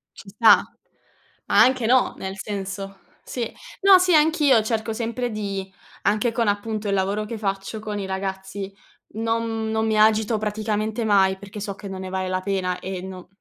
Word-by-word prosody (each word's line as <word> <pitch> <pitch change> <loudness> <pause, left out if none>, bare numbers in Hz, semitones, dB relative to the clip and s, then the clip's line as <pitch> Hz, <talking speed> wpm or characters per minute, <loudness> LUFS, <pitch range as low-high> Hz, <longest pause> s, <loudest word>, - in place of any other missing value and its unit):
Ci - - -12
sta. - - +6 0.8
Anche 250 0 +4
no, 255 +2 +3
nel 190 +1 -6
senso 195 -1 -5 0.2
sì. 235 -3 -4 0.3
No, 390 -1 +8
sì, 365 -1 +3
anch'io 300 -6 +4
cerco 220 0 -2
sempre 235 +2 -2
di 195 -2 -4 0.3
anche 215 +4 +2
con 230 -1 0
appunto 205 +1 -1
il 200 - 0
lavoro 200 +2 0
che 225 +1 -5
faccio 195 +1 -3
con 210 -1 -4
i 195 - -3
ragazzi, 190 +1 -4 0.4
non 225 +1 -1 0.2
m - - -2
non 220 0 0
mi 220 -1 +1
agito 220 +1 +4
praticamente 215 +1 -2
mai, 190 -2 +3
perché 200 +1 -9
so 200 -1 -4
che 200 - -9
non 190 -1 -6
ne 185 - -6
vale 190 0 -2
la 185 0 -1
pena 185 -2 -1
e 185 -1 -5
non 185 -1 -9
210 Hz, 180 wpm, -23 LUFS, 195-225 Hz, 0.8 s, No